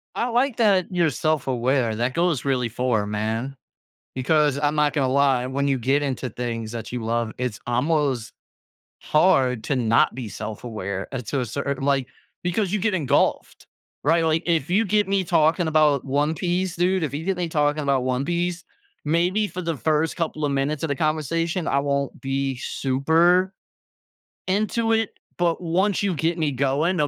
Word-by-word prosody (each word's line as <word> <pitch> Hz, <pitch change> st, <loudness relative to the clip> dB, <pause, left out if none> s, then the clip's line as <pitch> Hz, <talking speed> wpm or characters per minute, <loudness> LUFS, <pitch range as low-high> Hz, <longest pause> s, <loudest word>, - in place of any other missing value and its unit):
I 235 Hz, -, 0 dB
like 245 Hz, +1 st, +1 dB
that 200 Hz, -6 st, +3 dB
you're 170 Hz, -3 st, +2 dB
self-aware. 130 Hz, -5 st, 0 dB
That 120 Hz, +3 st, -1 dB
goes 170 Hz, -5 st, 0 dB
really 125 Hz, -3 st, 0 dB
far, 115 Hz, -3 st, 0 dB
man. 110 Hz, +6 st, -2 dB, 0.6 s
Because 145 Hz, +2 st, +2 dB
I'm 145 Hz, 0 st, +1 dB
not 150 Hz, -2 st, +2 dB
gonna 140 Hz, -3 st, +1 dB
lie, 135 Hz, -3 st, +3 dB
when 140 Hz, +2 st, -1 dB
you 135 Hz, -2 st, +1 dB
get 135 Hz, +5 st, +1 dB
into 130 Hz, -2 st, -3 dB
things 115 Hz, -2 st, -4 dB
that 115 Hz, 0 st, -6 dB
you 120 Hz, -2 st, -4 dB
love, 115 Hz, 0 st, -1 dB
it's 125 Hz, -4 st, -3 dB
almost 130 Hz, -2 st, 0 dB, 0.7 s
hard 130 Hz, -8 st, +2 dB
to 140 Hz, -, 0 dB
not 115 Hz, -3 st, +3 dB
be 125 Hz, -3 st, -5 dB
self-aware, 105 Hz, -3 st, -5 dB
uh, 135 Hz, -, -3 dB
to 125 Hz, +4 st, -3 dB
a -, -, 0 dB
certai 140 Hz, +3 st, -3 dB
like, 135 Hz, -2 st, +1 dB, 0.4 s
because 180 Hz, +2 st, 0 dB
you 210 Hz, -, +1 dB
get 210 Hz, +1 st, 0 dB
engulfed. 150 Hz, -9 st, 0 dB, 0.4 s
Right? 165 Hz, +3 st, +3 dB
Like, 160 Hz, +1 st, +1 dB
if 165 Hz, -4 st, 0 dB
you 210 Hz, +5 st, +3 dB
get 205 Hz, 0 st, +2 dB
me 195 Hz, -1 st, +1 dB
talking 165 Hz, -1 st, +2 dB
about 150 Hz, -3 st, +3 dB
One 145 Hz, +4 st, 0 dB
Piece, 180 Hz, +1 st, -1 dB
dude, 185 Hz, +2 st, +1 dB
if 150 Hz, -, -3 dB
you 155 Hz, +3 st, -4 dB
get 195 Hz, -1 st, 0 dB
me 175 Hz, -2 st, -2 dB
talking 150 Hz, 0 st, +1 dB
about 135 Hz, -3 st, +1 dB
One 130 Hz, +1 st, 0 dB
Piece, 175 Hz, +2 st, -2 dB, 0.4 s
maybe 175 Hz, +7 st, +1 dB
for 185 Hz, -, -6 dB
the 165 Hz, -1 st, -1 dB
first 155 Hz, +2 st, 0 dB
couple 155 Hz, -3 st, -2 dB
of 145 Hz, -, -1 dB
minutes 140 Hz, +2 st, -1 dB
of 160 Hz, -, -1 dB
the 140 Hz, -, 0 dB
conversation, 160 Hz, +4 st, -1 dB
I 140 Hz, -, +2 dB
won't 140 Hz, -1 st, -2 dB
be 135 Hz, 0 st, -1 dB
super 160 Hz, +9 st, +2 dB, 1.0 s
into 215 Hz, +4 st, +1 dB
it, 225 Hz, -1 st, +1 dB, 0.3 s
but 175 Hz, 0 st, 0 dB
once 185 Hz, +4 st, +1 dB
you 200 Hz, -3 st, 0 dB
get 165 Hz, +3 st, -1 dB
me 155 Hz, -2 st, +1 dB
going, 140 Hz, +7 st, 0 dB
the 150 Hz, -, +2 dB
145 Hz, 180 wpm, -23 LUFS, 130-175 Hz, 1.0 s, that